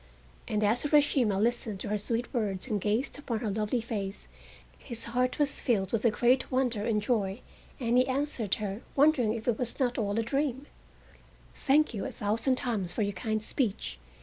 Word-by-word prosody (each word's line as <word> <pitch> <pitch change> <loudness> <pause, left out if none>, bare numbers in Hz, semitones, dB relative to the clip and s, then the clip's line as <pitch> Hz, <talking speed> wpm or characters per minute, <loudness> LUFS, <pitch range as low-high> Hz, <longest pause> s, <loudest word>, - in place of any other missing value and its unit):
And 210 0 0
as 215 +4 +3
Urashima 280 -8 +3
listened 225 -2 0
to - - -4
her 210 - +1
sweet 230 +3 -2
words 205 -5 -1
and 210 -5 -1
gazed 220 +8 -1
upon 235 -6 -3
her 220 -4 -1
lovely 215 +4 0
face 205 -4 -4 0.5
his 235 -3 -4
heart 250 +2 0
was 290 -2 0
filled 200 -6 +1
with 225 -2 0
a - - +7
great 250 +4 +2
wonder 250 -5 +1
and 215 -2 +2
joy, 210 -2 -1 0.4
and 240 -1 +3
he 255 - +3
answered 260 -6 +1
her, 205 +1 -4
wondering 275 -6 +4
if 225 +1 -7
it 235 -3 +1
was 245 -2 -4
not 245 -2 +1
all 205 -1 -1
a 230 - +2
dream: 275 +2 -1 0.9
"Thank 300 0 +2
you 205 - -3
a - - -3
thousand 225 +5 0
times 225 -9 -2
for 215 - 0
your 200 0 -1
kind 215 +3 -2
speech. 215 - -2
230 Hz, 190 wpm, -29 LUFS, 210-255 Hz, 0.9 s, a